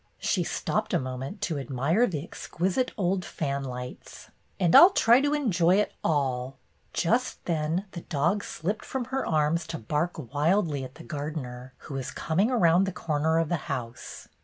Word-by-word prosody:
She -, -, 0 dB
stopped -, -, -1 dB
a -, -, +3 dB
moment 130 Hz, +9 st, -5 dB
to 165 Hz, -8 st, -1 dB
ad 135 Hz, -, -7 dB
mire 155 Hz, -, +2 dB
the 155 Hz, -6 st, -3 dB
exquisite 185 Hz, +8 st, -2 dB
old 185 Hz, -1 st, 0 dB
fan 140 Hz, -4 st, -3 dB
lights. 125 Hz, -1 st, -8 dB, 0.3 s
"And 175 Hz, -3 st, +3 dB
I -, -, +13 dB
'll 355 Hz, -, +10 dB
try 245 Hz, -, +5 dB
to 290 Hz, +1 st, +1 dB
enjoy 185 Hz, -, +3 dB
it 210 Hz, -, +1 dB
all 135 Hz, -3 st, 0 dB, 0.2 s
!" -, -, -40 dB
Just 235 Hz, +9 st, 0 dB
then 165 Hz, +3 st, -1 dB
the 170 Hz, -, -7 dB
dog 170 Hz, +9 st, 0 dB
slipped 195 Hz, +7 st, -3 dB
from 260 Hz, -2 st, -3 dB
her 270 Hz, -, +1 dB
arms 155 Hz, +2 st, +1 dB
to -, -, -4 dB
bark 150 Hz, +10 st, -2 dB, 0.2 s
wildly 155 Hz, -1 st, +1 dB
at 130 Hz, +1 st, -9 dB
the 165 Hz, -, -11 dB
gardener, 140 Hz, -5 st, -6 dB
who -, -, -7 dB
was 135 Hz, -2 st, -3 dB
coming 185 Hz, +8 st, 0 dB
around 180 Hz, -7 st, +4 dB
the 195 Hz, -, -2 dB
corner 160 Hz, -2 st, 0 dB
of 165 Hz, -2 st, +1 dB
the 175 Hz, -, +1 dB
house. 120 Hz, -4 st, -6 dB
165 Hz, 185 wpm, -27 LUFS, 140-190 Hz, 0.3 s, I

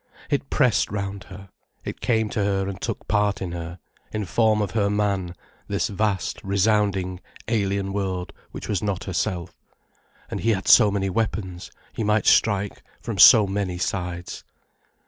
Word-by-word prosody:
It -, -, -1 dB
pressed -, -, +2 dB
round 100 Hz, -1 st, -4 dB
her, 95 Hz, 0 st, -12 dB, 0.4 s
it -, -, -6 dB
came 110 Hz, -2 st, +1 dB
to 105 Hz, -, 0 dB
her 95 Hz, -1 st, 0 dB
and 100 Hz, 0 st, -6 dB
took 115 Hz, -, -4 dB
part 105 Hz, -1 st, +1 dB
in 90 Hz, -2 st, -4 dB
her, 85 Hz, 0 st, -6 dB, 0.3 s
in 105 Hz, -1 st, -3 dB
form 110 Hz, +3 st, +2 dB
of 105 Hz, -3 st, -1 dB
her 100 Hz, -2 st, +1 dB
man, 100 Hz, -4 st, -1 dB, 0.3 s
this -, -, -1 dB
vast, 100 Hz, -3 st, -2 dB
resounding, 100 Hz, -2 st, +1 dB, 0.3 s
alien 100 Hz, -3 st, -1 dB
world 95 Hz, -3 st, -3 dB, 0.2 s
which -, -, -8 dB
was 100 Hz, -4 st, -1 dB
not 100 Hz, -2 st, -2 dB
herself. 90 Hz, -1 st, -3 dB, 0.8 s
And -, -, -3 dB
he 115 Hz, +1 st, +2 dB
had 95 Hz, -1 st, -4 dB
so 110 Hz, -4 st, +7 dB
many 100 Hz, -1 st, -1 dB
weapons, 95 Hz, -4 st, -3 dB, 0.2 s
he 115 Hz, -, -3 dB
might 105 Hz, 0 st, +1 dB
strike 100 Hz, -2 st, +2 dB, 0.2 s
from 110 Hz, -5 st, -5 dB
so 110 Hz, +3 st, +9 dB
many 95 Hz, -2 st, -2 dB
sides. 90 Hz, -1 st, -4 dB
100 Hz, 160 wpm, -24 LUFS, 95-105 Hz, 0.8 s, so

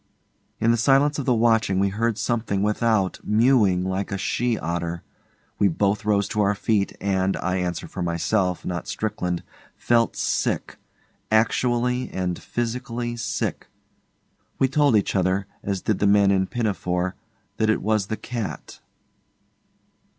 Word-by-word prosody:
In 115 Hz, +1 st, +3 dB
the 115 Hz, -, +2 dB
silence 140 Hz, +4 st, +3 dB
of 140 Hz, -, -4 dB
the 125 Hz, -, +4 dB
watching 110 Hz, -4 st, +2 dB
we 100 Hz, +1 st, +2 dB
heard 110 Hz, +2 st, -1 dB
something 110 Hz, -5 st, -1 dB
without 105 Hz, -2 st, +1 dB
mewing 105 Hz, -5 st, +3 dB
like 95 Hz, +2 st, -2 dB
a 100 Hz, -, -1 dB
she 120 Hz, +4 st, 0 dB
otter. 85 Hz, 0 st, -3 dB, 0.6 s
We 100 Hz, -, +5 dB
both 100 Hz, +4 st, 0 dB
rose 100 Hz, -2 st, +2 dB
to 105 Hz, -, 0 dB
our 100 Hz, 0 st, +2 dB
feet, 105 Hz, 0 st, 0 dB
and, 95 Hz, -1 st, 0 dB
I 90 Hz, +1 st, -1 dB
answer 90 Hz, -2 st, -3 dB
for 95 Hz, -, -6 dB
myself, 90 Hz, +2 st, 0 dB
not 85 Hz, -1 st, -4 dB
Strickland, 90 Hz, -5 st, -2 dB, 0.3 s
felt 115 Hz, -1 st, +2 dB
sick -, -, -1 dB, 0.5 s
actually 120 Hz, +3 st, +1 dB
and 90 Hz, -2 st, -3 dB
physically 120 Hz, 0 st, -3 dB
sick. 115 Hz, -3 st, -3 dB, 0.9 s
We 135 Hz, -, +3 dB
told 140 Hz, -2 st, +3 dB
each 105 Hz, -, +1 dB
other, 95 Hz, +1 st, +1 dB, 0.2 s
as 100 Hz, -2 st, -2 dB
did 105 Hz, -, 0 dB
the 100 Hz, -, +3 dB
men 100 Hz, -1 st, +5 dB
in 95 Hz, -1 st, +2 dB
Pinafore, 95 Hz, -5 st, -1 dB, 0.4 s
that 110 Hz, -1 st, +1 dB
it 110 Hz, -, +1 dB
was 110 Hz, -1 st, +1 dB
the 110 Hz, -, -3 dB
cat. 120 Hz, -4 st, -6 dB
105 Hz, 145 wpm, -24 LUFS, 95-115 Hz, 0.9 s, We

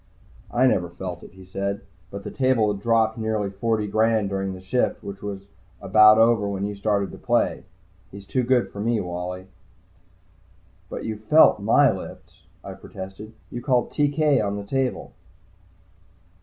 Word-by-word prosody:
"I 125 Hz, +2 st, +2 dB
never 90 Hz, -9 st, +2 dB
felt 85 Hz, 0 st, -7 dB
it," -, -, -14 dB
he 95 Hz, 0 st, -14 dB
said. 100 Hz, +2 st, -3 dB, 0.3 s
"But 100 Hz, +1 st, -8 dB
the -, -, -6 dB
table 125 Hz, -6 st, +2 dB
had 100 Hz, -, -8 dB
dropped 115 Hz, 0 st, +2 dB
nearly 110 Hz, -3 st, -1 dB
forty 110 Hz, +2 st, -1 dB
grand 110 Hz, 0 st, +1 dB
during 95 Hz, -1 st, -2 dB
the 95 Hz, -, -9 dB
shift, 110 Hz, +7 st, -1 dB
which 100 Hz, -1 st, -8 dB
was 100 Hz, -1 st, -6 dB, 0.3 s
about 110 Hz, 0 st, +6 dB
over 115 Hz, -2 st, +4 dB
when 100 Hz, 0 st, -3 dB
you 105 Hz, -, -3 dB
started 100 Hz, -1 st, -1 dB
to -, -, -11 dB
play. -, -, 0 dB, 0.4 s
He's 100 Hz, 0 st, -11 dB
too 130 Hz, +6 st, 0 dB
good 125 Hz, 0 st, +2 dB
for 100 Hz, -, -11 dB
me, 115 Hz, +1 st, +1 dB
Wally." 90 Hz, +1 st, -5 dB, 1.4 s
"But -, -, -6 dB
you 110 Hz, -1 st, -3 dB
felt 110 Hz, +3 st, +5 dB
my 115 Hz, +6 st, +4 dB
lifts," 95 Hz, -, -10 dB, 0.2 s
I -, -, -7 dB
protested. 95 Hz, +3 st, -10 dB, 0.2 s
"You 120 Hz, -, -5 dB
called 125 Hz, -2 st, +1 dB
'TK' 145 Hz, -3 st, +2 dB
on 100 Hz, 0 st, -2 dB
the 100 Hz, -, -5 dB
table." 135 Hz, +3 st, -2 dB
105 Hz, 165 wpm, -24 LUFS, 100-115 Hz, 1.4 s, about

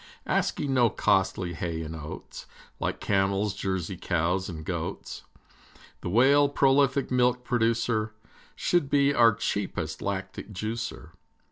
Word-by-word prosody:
Asking 140 Hz, -2 st, 0 dB
no 120 Hz, -3 st, +4 dB
costly 95 Hz, -2 st, +1 dB
hay 80 Hz, -1 st, -3 dB
and 80 Hz, +1 st, -6 dB
oats, 80 Hz, -1 st, -8 dB, 0.3 s
Like -, -, -2 dB
camels, 100 Hz, +1 st, +1 dB
Jersey 95 Hz, -2 st, -3 dB
cows, 90 Hz, +2 st, 0 dB
and 80 Hz, -3 st, -7 dB
goats, -, -, -4 dB, 0.8 s
The -, -, -4 dB
Whale, 140 Hz, +7 st, +5 dB
prolific 140 Hz, -1 st, +3 dB
milk 125 Hz, 0 st, +2 dB
producer, 115 Hz, -2 st, +1 dB, 0.4 s
Should 175 Hz, -6 st, +1 dB
be 140 Hz, 0 st, +3 dB
our 115 Hz, -5 st, +5 dB
cheapest 100 Hz, -3 st, -3 dB
lactic 105 Hz, -, -4 dB
juicer. 110 Hz, +3 st, -5 dB
110 Hz, 120 wpm, -27 LUFS, 95-125 Hz, 0.8 s, Whale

